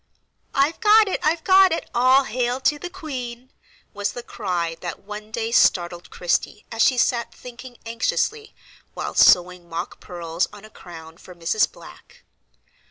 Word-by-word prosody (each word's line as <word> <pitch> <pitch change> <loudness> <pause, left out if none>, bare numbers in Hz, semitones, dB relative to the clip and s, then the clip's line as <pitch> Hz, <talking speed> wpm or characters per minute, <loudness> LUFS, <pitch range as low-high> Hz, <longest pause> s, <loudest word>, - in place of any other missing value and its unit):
"I've 280 +4 +2
got 430 -1 +6
it! 385 - -2
I've 320 +1 0
got 380 -1 +6
it! 330 - -2
All 255 +3 +4
hail 245 +1 -2
to 295 +2 +1
the 355 - -6
queen!" 260 -8 -7 0.4
was 205 0 -2
the 245 - -7
cry 175 -8 -3
that 175 +2 -6
one 210 +1 -8
day 225 +1 -3
startled 175 -6 +2
Christie 175 +3 -2
as 225 -1 -2
she 255 - +4
sat 235 -1 0
thinking 250 0 -11
anxiously, 235 - -2 0.4
while - - -4
sewing 180 -1 +4
mock 170 +3 -5
pearls 170 -1 -3
on 205 +1 -13
a 215 - -15
crown 165 -4 -12
for 180 - -13
Mrs. 175 +5 +1
Black. - - -16
230 Hz, 160 wpm, -22 LUFS, 180-265 Hz, 0.4 s, got